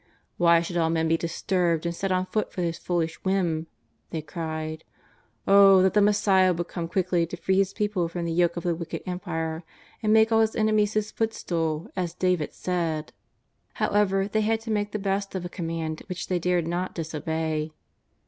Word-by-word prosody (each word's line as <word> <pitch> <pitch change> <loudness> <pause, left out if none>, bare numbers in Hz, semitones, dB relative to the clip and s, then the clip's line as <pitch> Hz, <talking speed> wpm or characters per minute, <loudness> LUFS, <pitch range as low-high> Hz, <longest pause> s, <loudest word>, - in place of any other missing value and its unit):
" - - -41
Why 170 -1 +5
should 175 +1 -4
all 165 -1 +2
men 160 0 +1
be 165 - +3
disturbed 170 0 0
and 170 - -1
set 195 +2 -2
on 185 0 +1
foot 215 +2 -2
for 180 - -3
his 165 -1 -2
foolish 165 -2 -2
whim 175 -4 0 0.2
?" - - -45
they 160 -2 -4
cried. 160 -1 -5 0.6
'^O, 195 -1 +7
that 190 - +3
the 210 - +4
Messiah 200 -3 +4
would 175 0 -3
come 170 -2 -4
quickly 175 -1 +1
to 175 - -7
free 190 +2 +1
His 195 -1 +2
people 205 -5 -1
from 170 +1 -4
the 165 - -2
yoke 170 +1 +2
of 170 - -4
the 175 - +1
wicked 165 0 -6
empire, 165 -3 -3 0.4
and 215 -2 +1
make 220 +1 +5
all 225 0 +5
His 220 0 +1
enemies 215 -1 +2
His 215 0 -1
foot 225 0 -1
stool 165 -2 -2
as 175 -2 -2
David 180 -4 0
said! 165 -4 -2 0.3
" - - -45
However, 195 -1 +1
they 215 +1 0
had 220 +1 +1
to 225 0 -5
make 205 -1 0
the 215 - -2
Ix^st 195 0 -2
of 180 -2 -3
a - - -4
command 165 -2 -4
which 180 -1 -5
they 180 -1 +1
dared 175 -1 +1
not 175 +2 -3
disobey. 160 -1 -2
175 Hz, 205 wpm, -26 LUFS, 165-195 Hz, 0.6 s, ^O